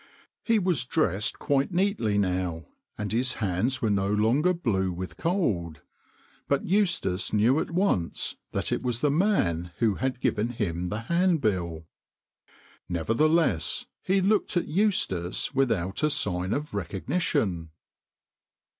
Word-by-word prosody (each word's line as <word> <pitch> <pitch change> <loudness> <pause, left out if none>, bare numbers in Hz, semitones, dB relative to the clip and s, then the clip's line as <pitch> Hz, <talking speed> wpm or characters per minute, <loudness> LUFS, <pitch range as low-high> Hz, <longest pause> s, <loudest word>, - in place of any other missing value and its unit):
He 225 -1 +2
was 180 - +1
dressed 115 - 0
quite 140 +2 0
neatly 175 - +1
now, 90 -4 -1 0.3
and 105 0 -3
his 125 +3 +1
hands 110 +6 -1
were 110 - +2
no 100 0 +1
longer 115 +12 +3
blue 105 - 0
with 90 +1 -6
cold, 105 - -1 0.7
but 140 - +1
Eustace 170 - +1
knew 115 +7 +3
at - - -2
once 170 - 0 0.2
that - - -1
it - - 0
was 125 -2 -2
the 145 - +3
man 95 - +1
who 115 -3 +2
had 130 -1 -1
given 110 -2 0
him 90 -6 -2
the 105 +4 -3
handbill. 110 - 0 1.0
Never 85 +4 -1
theless 155 - +2 0.2
he 190 +1 +1
looked 200 -1 +1
at 175 - 0
Eustace 150 - 0
without 110 -9 0
a 150 - +3
sign 90 -8 -1
of 150 0 -2
recognition. 95 - -1
115 Hz, 135 wpm, -27 LUFS, -, 1.0 s, longer